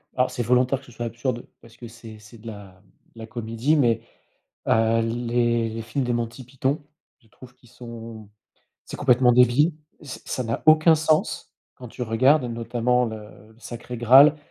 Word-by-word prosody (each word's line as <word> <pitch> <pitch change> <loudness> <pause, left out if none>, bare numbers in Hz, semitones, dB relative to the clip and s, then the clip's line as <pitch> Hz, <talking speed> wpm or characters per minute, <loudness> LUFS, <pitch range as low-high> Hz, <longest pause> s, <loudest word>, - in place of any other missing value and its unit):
alors, 125 0 +1
c'est 120 - -3
volontaire 125 +3 +2
que 135 - -19
ce 125 - -16
soit 120 0 -6
absurde, 120 +1 -4
parce 115 0 -18
que 120 - -10
c'est 110 -2 -13
c'est 105 +2 -16
de 115 - -13
la 100 -3 -11 0.3
de - - -14
la 110 - -8
comédie 115 +6 -1
mais, 120 -6 +2 0.7
heu, 115 0 +2
les 120 0 0
les 115 +1 -6
films 120 +4 -3
de 120 - -1
Monty 120 +2 -4
Python, 135 +3 -2 0.4
je 115 - -28
trouve 125 +2 -16
qu'ils 120 - -23
sont 115 -3 -11 0.6
c'est - - -8
complètement 125 -2 +3
débile, 125 +7 +4 0.3
ç 140 - -9
ça 130 - -4
n'a 115 +1 -3
aucun 155 +1 +6
sens, 155 0 -1 0.2
quand 125 -2 -11
tu 125 - -8
regardes 130 +5 +3
notamment 120 +1 -1
le, 110 -1 -5
heu, 110 +1 -15
Sacré 120 +1 -8
Graal, 135 +6 +6
120 Hz, 180 wpm, -23 LUFS, 115-125 Hz, 0.7 s, aucun